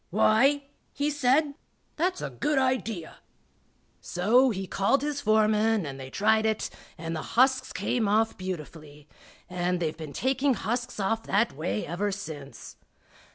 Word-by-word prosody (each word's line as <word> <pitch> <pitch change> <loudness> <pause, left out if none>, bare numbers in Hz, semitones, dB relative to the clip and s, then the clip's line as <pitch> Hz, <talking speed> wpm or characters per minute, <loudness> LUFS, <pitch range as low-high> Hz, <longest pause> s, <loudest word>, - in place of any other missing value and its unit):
"Why," 230 +8 +3 0.3
he 290 +1 0
said, 290 +1 +2 0.4
"that's 360 +3 -1
a - - -4
good 295 -1 -1
idea." 250 -9 -1 0.8
So 230 +9 +3
he 195 -4 -3
called 200 +9 +1
his 290 -1 -2
foreman 215 -1 +3
and 135 -2 -6
they 130 0 -8
tried 220 +8 +2
it, 220 -1 -1 0.3
and 165 +1 -4
the 155 - -3 0.2
husks 260 +1 +4
came 230 -4 -1
off 220 +2 +2
beautifully, 155 -5 -8 0.4
and 180 0 -1
they've 160 -2 -2
been 155 -3 -8
taking 265 +1 +1
husks 240 +3 -3
off 225 +3 0
that 215 +4 +2
way 105 -8 -2
ever 195 +6 -2
since. 155 -8 -8
215 Hz, 145 wpm, -27 LUFS, 175-260 Hz, 0.8 s, husks